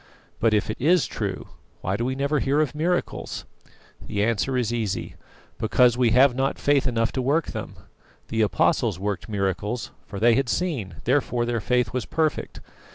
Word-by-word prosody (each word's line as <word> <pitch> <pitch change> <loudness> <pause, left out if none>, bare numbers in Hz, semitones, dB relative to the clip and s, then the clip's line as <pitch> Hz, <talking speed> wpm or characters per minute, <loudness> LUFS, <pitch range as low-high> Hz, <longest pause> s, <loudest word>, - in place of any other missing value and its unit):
But 110 -1 +3
if 105 +1 0
it - - -6
is 170 +4 +4
true, - - -4 0.3
why 95 - -1
do 115 - -2
we 130 +2 -1
never 140 +2 0
hear 140 +3 +1
of 150 -4 +1
miracles? 175 +4 -2 0.6
The 100 0 -2
answer 115 +4 0
is 120 -2 0
easy: 110 -5 -2 0.5
Because 120 +2 +4
we 125 -2 +3
have 125 +3 +5
not 135 +2 0
faith 140 -1 +2
enough 115 -2 +1
to 130 - -2
work 145 +6 +1
them. - - -6 0.5
The 110 - 0
Apostles 105 -4 +2
worked 100 +2 -3
miracles; 105 +3 -2 0.2
for 100 - -6
they 120 +2 +5
had 135 +1 +1
seen, 140 - -2
therefore 125 -2 +1
their 120 -2 -1
faith 125 +2 +1
was 125 -3 -2
perfect. 155 -2 -1
120 Hz, 175 wpm, -24 LUFS, 110-135 Hz, 0.6 s, have